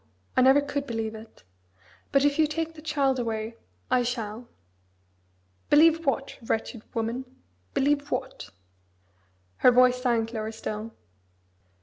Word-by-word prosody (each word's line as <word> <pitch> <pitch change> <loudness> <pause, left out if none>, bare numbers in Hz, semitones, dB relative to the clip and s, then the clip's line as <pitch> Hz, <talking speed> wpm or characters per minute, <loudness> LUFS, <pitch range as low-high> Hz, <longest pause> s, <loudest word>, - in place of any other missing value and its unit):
I - - +4
never 265 +3 +6
could 285 0 -3
believe 225 -2 -3
it. 220 - -13 0.7
But 275 0 +4
if 290 +1 +1
you 310 - +5
take 325 +2 -3
the 310 - -12
child 280 -4 +1
away 225 -1 -3 0.3
I 255 - +4
shall." 235 -1 -4 1.2
"Believe 325 +2 +5
what, 270 0 -1
wretched 225 0 -3
woman? 230 +3 -2 0.5
believe 285 +1 +1
what?" 95 - -4 1.1
Her - - +6
voice 250 0 +4
sank 235 -2 0
lower 220 -1 -3
still. 220 0 -5
250 Hz, 125 wpm, -27 LUFS, 225-285 Hz, 1.2 s, never